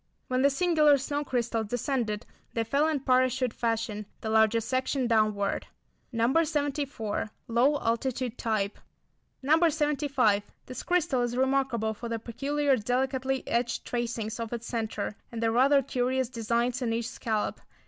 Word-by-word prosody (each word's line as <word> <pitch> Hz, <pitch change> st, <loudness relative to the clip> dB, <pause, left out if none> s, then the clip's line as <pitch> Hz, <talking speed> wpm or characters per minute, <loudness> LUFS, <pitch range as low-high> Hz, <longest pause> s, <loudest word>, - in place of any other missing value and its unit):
When 255 Hz, 0 st, +1 dB
these 275 Hz, 0 st, +3 dB
singular 310 Hz, -5 st, +4 dB
snow 285 Hz, +2 st, -2 dB
crystals 235 Hz, -4 st, -1 dB
descended 240 Hz, -2 st, -1 dB, 0.3 s
they 230 Hz, -, 0 dB
fell 280 Hz, +7 st, +2 dB
in 305 Hz, -4 st, 0 dB
parachute 255 Hz, -1 st, +2 dB
fashion, 225 Hz, -3 st, -2 dB
the 220 Hz, -, -3 dB
larger 220 Hz, +1 st, +4 dB
section 260 Hz, +3 st, -1 dB
downward. 215 Hz, -3 st, +1 dB, 0.4 s
No. 245 Hz, +7 st, +3 dB
74. 285 Hz, -8 st, -2 dB, 0.2 s
Low 250 Hz, +6 st, +3 dB
altitude 235 Hz, +1 st, -1 dB
type. 215 Hz, -4 st, -1 dB, 0.6 s
No. 320 Hz, +5 st, +4 dB
75. 285 Hz, -8 st, +2 dB, 0.2 s
This 255 Hz, -1 st, -6 dB
crystal 335 Hz, -8 st, +1 dB
is 240 Hz, 0 st, -1 dB
remarkable 260 Hz, -4 st, +1 dB
for 235 Hz, +2 st, -7 dB
the 230 Hz, -, -1 dB
peculiar 275 Hz, +5 st, 0 dB
delicately 260 Hz, +3 st, -1 dB
etched 240 Hz, +1 st, -1 dB
tracings 230 Hz, -2 st, -3 dB
of 230 Hz, -1 st, -4 dB
its 235 Hz, 0 st, -4 dB
centre, 220 Hz, -3 st, -3 dB, 0.2 s
and 230 Hz, -1 st, -4 dB
the 225 Hz, -, +2 dB
rather 270 Hz, +4 st, +4 dB
curious 255 Hz, 0 st, 0 dB
designs 235 Hz, +1 st, -1 dB
in 230 Hz, -2 st, 0 dB
each 230 Hz, 0 st, -1 dB
scallop. 220 Hz, -2 st, -2 dB
245 Hz, 145 wpm, -28 LUFS, 225-275 Hz, 0.6 s, singular